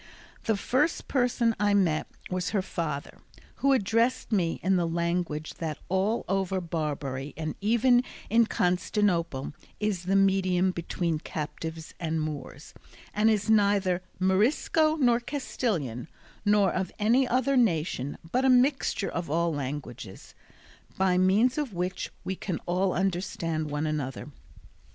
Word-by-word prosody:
The 220 Hz, -2 st, +1 dB
first 290 Hz, +10 st, 0 dB
person 245 Hz, -3 st, +1 dB
I 205 Hz, 0 st, +3 dB
met 170 Hz, -6 st, +2 dB, 0.2 s
was 180 Hz, 0 st, -1 dB
her 200 Hz, -3 st, 0 dB
father, 150 Hz, -6 st, -4 dB, 0.4 s
who 275 Hz, -, +2 dB
addressed 230 Hz, 0 st, +1 dB
me 175 Hz, -6 st, +1 dB
in 190 Hz, +1 st, +3 dB
the 175 Hz, -2 st, +1 dB
language 170 Hz, -2 st, -2 dB
that 160 Hz, -3 st, -3 dB
all 195 Hz, +5 st, 0 dB
over 190 Hz, 0 st, 0 dB
Barbary 145 Hz, -5 st, -3 dB
and 155 Hz, -1 st, -3 dB
even 235 Hz, +4 st, +4 dB, 0.2 s
in 230 Hz, +1 st, +4 dB
Constantinople 180 Hz, -7 st, 0 dB, 0.3 s
is 205 Hz, -4 st, -1 dB
the 195 Hz, +2 st, +1 dB
medium 190 Hz, -2 st, +3 dB
between 170 Hz, -2 st, -2 dB
captives 160 Hz, +1 st, -6 dB
and 160 Hz, -2 st, -1 dB
Moors, 150 Hz, -4 st, -6 dB, 0.4 s
and 210 Hz, +2 st, +3 dB
is 210 Hz, -2 st, +1 dB
neither 200 Hz, -4 st, +3 dB, 0.2 s
Morisco 245 Hz, -, +2 dB
nor 245 Hz, -6 st, +3 dB
Castilian, 210 Hz, -, -3 dB, 0.4 s
nor 205 Hz, -3 st, +3 dB
of 185 Hz, 0 st, -2 dB
any 235 Hz, +5 st, +3 dB
other 260 Hz, +3 st, +1 dB
nation, 160 Hz, -, +1 dB
but 255 Hz, -, +2 dB
a 265 Hz, -, +4 dB
mixture 255 Hz, -4 st, +3 dB
of 170 Hz, -4 st, -4 dB
all 170 Hz, +2 st, +1 dB
languages, 135 Hz, -7 st, -6 dB, 0.6 s
by 190 Hz, -1 st, +3 dB
means 215 Hz, +9 st, +3 dB
of 280 Hz, -8 st, -3 dB
which 180 Hz, +2 st, -2 dB
we 190 Hz, -, -3 dB
can 180 Hz, -2 st, -3 dB
all 185 Hz, +2 st, +1 dB
understand 175 Hz, -4 st, -1 dB
one 150 Hz, +1 st, -2 dB
another. 150 Hz, -3 st, -3 dB
185 Hz, 135 wpm, -28 LUFS, 165-220 Hz, 0.6 s, even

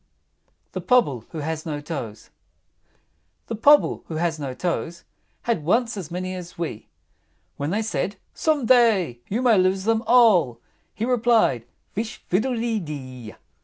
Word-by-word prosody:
THE -, -, -4 dB
POBBLE 145 Hz, -, +2 dB
WHO -, -, -8 dB
HAS 155 Hz, +1 st, -3 dB
NO 150 Hz, -2 st, -3 dB
TOES. 125 Hz, -9 st, -7 dB
I. 80 Hz, 0 st, -46 dB, 0.6 s
The 230 Hz, -, -4 dB
Pobble 290 Hz, +7 st, +4 dB
who 160 Hz, -, -5 dB
has 160 Hz, -1 st, -1 dB
no 135 Hz, -3 st, -4 dB
toes 170 Hz, 0 st, -3 dB, 0.4 s
Had 230 Hz, -10 st, -1 dB
once 230 Hz, +8 st, +1 dB
as 185 Hz, -6 st, -6 dB
many 185 Hz, +1 st, -4 dB
as 180 Hz, -1 st, -8 dB
we; 160 Hz, -10 st, -5 dB, 0.7 s
When 145 Hz, +1 st, -2 dB
they 210 Hz, +5 st, 0 dB
said, 210 Hz, -2 st, -2 dB, 0.2 s
"Some 305 Hz, -5 st, 0 dB
day 220 Hz, -, +4 dB
you 230 Hz, +6 st, -1 dB
may 230 Hz, -6 st, +5 dB
lose 185 Hz, +1 st, +2 dB
them 225 Hz, +1 st, +2 dB
all;" 210 Hz, -, +5 dB, 0.4 s
He 220 Hz, -, -2 dB
replied, 230 Hz, -, +2 dB, 0.3 s
"Fish 220 Hz, +2 st, -4 dB
fiddle 225 Hz, +8 st, +1 dB
de 230 Hz, -1 st, -1 dB
dee!" 130 Hz, -, -8 dB
185 Hz, 155 wpm, -23 LUFS, 145-225 Hz, 0.7 s, may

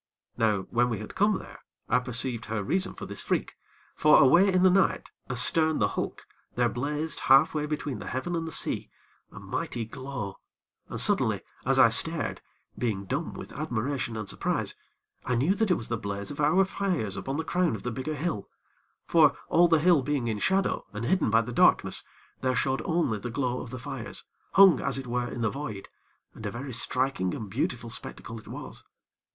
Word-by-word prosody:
Now 105 Hz, -3 st, +1 dB
when 120 Hz, +1 st, +2 dB
we 115 Hz, -, -2 dB
had 105 Hz, +1 st, -8 dB
come 205 Hz, 0 st, +2 dB
there, -, -, -11 dB, 0.3 s
I -, -, +3 dB
perceived 125 Hz, -1 st, -1 dB
her 110 Hz, -2 st, -2 dB
reason 190 Hz, -, 0 dB
for -, -, -7 dB
this -, -, -3 dB
freak; -, -, -2 dB, 0.4 s
for 150 Hz, 0 st, +5 dB
away 175 Hz, +9 st, +6 dB
in 185 Hz, 0 st, +3 dB
the 185 Hz, -, +6 dB
night, 190 Hz, +1 st, +1 dB, 0.2 s
astern 155 Hz, +5 st, +3 dB
the -, -, +2 dB
hulk, -, -, -4 dB, 0.3 s
there 120 Hz, -1 st, +2 dB
blazed 150 Hz, +7 st, -2 dB
half 135 Hz, +4 st, +6 dB
way 150 Hz, -1 st, -1 dB
between 150 Hz, -2 st, -3 dB
the -, -, -8 dB
heaven 170 Hz, +7 st, -3 dB
and 165 Hz, -1 st, -2 dB
the -, -, -5 dB
sea, -, -, -1 dB, 0.4 s
a -, -, -10 dB
mighty 115 Hz, -2 st, -3 dB
glow, 120 Hz, -5 st, -6 dB, 0.5 s
and -, -, -4 dB
suddenly, -, -, +3 dB, 0.3 s
as -, -, +3 dB
I -, -, +7 dB
stared, -, -, +2 dB, 0.3 s
being 105 Hz, -5 st, -2 dB
dumb 140 Hz, -, -3 dB
with -, -, -9 dB
admiration 125 Hz, -4 st, -3 dB
and 105 Hz, -2 st, -5 dB
surprise, -, -, -1 dB, 0.5 s
I 125 Hz, -, -1 dB
knew 140 Hz, +11 st, +2 dB
that 220 Hz, +1 st, 0 dB
it 180 Hz, -, +4 dB
was 110 Hz, -, -5 dB
the 115 Hz, -, -1 dB
blaze 100 Hz, 0 st, -4 dB
of 145 Hz, -, -5 dB
our 185 Hz, +7 st, +4 dB
fires 180 Hz, -, -2 dB
upon 135 Hz, +1 st, -4 dB
the 160 Hz, -, -1 dB
crown 175 Hz, -5 st, 0 dB
of 100 Hz, -, -8 dB
the 125 Hz, -, -2 dB
bigger 135 Hz, +6 st, -4 dB
hill; 145 Hz, -, -3 dB, 0.6 s
for, 150 Hz, -4 st, +4 dB
all 175 Hz, +1 st, +5 dB
the 165 Hz, -1 st, +4 dB
hill 165 Hz, -1 st, +4 dB
being 135 Hz, -3 st, -1 dB
in 110 Hz, -2 st, -2 dB
shadow, 190 Hz, -, +1 dB
and 105 Hz, +2 st, -4 dB
hidden 185 Hz, -3 st, +2 dB
by 110 Hz, +2 st, +4 dB
the 120 Hz, +2 st, -6 dB
darkness, -, -, +3 dB, 0.4 s
there 130 Hz, -1 st, 0 dB
showed 135 Hz, 0 st, 0 dB
only 160 Hz, -, 0 dB
the 120 Hz, -, -5 dB
glow 125 Hz, 0 st, -2 dB
of -, -, -8 dB
the 130 Hz, -, -6 dB
fires, 130 Hz, -1 st, -5 dB, 0.3 s
hung, 195 Hz, -3 st, +7 dB
as 135 Hz, -1 st, +1 dB
it 135 Hz, -, -4 dB
were, 120 Hz, 0 st, -2 dB
in 120 Hz, -, -6 dB
the 115 Hz, -, +1 dB
void, 135 Hz, -9 st, -6 dB, 0.4 s
and -, -, -12 dB
a -, -, -2 dB
very 130 Hz, +2 st, -6 dB
striking 125 Hz, -6 st, +1 dB
and 105 Hz, -3 st, -7 dB
beautiful 120 Hz, 0 st, -2 dB
spectacle 115 Hz, -1 st, -7 dB
it -, -, -17 dB
was. -, -, -8 dB
130 Hz, 200 wpm, -27 LUFS, 115-160 Hz, 0.6 s, I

